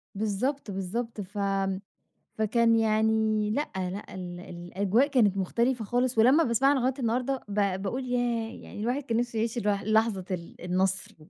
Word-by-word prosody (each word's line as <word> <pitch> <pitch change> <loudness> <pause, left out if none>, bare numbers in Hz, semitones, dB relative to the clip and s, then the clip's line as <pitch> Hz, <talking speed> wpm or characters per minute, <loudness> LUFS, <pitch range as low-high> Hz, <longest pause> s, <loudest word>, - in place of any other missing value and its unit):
بالضبط، 220 +4 -1
بالضبط. 210 +4 -3
ف 200 +2 -10 1.0
فكان 230 +2 +3
يعني 220 -1 +2
لأ، 290 +7 -1
لأ، 190 +2 -4
ال 175 -1 -6
الأجواء 190 +8 0
كانت 220 -9 +3
مختلفة 235 +5 0
خالص 245 +2 0
ولمّا 260 +9 +6
باسمعها 270 +4 +3
لغاية 260 0 +1
النهارده، 250 +3 0
ب 200 -2 0
باقول 250 +7 -3
ياه، 240 -2 -1
يعني - - -9
الواحد 250 +5 -1
كان 230 -3 -1
نِفْسه 240 -1 -1
يعيش 230 +2 -1
الوح 205 -3 0
لحظة 215 -2 +2
ال 170 -2 -6
النَصْر. 185 +1 -1
220 Hz, 150 wpm, -28 LUFS, 195-245 Hz, 1.0 s, ولمّا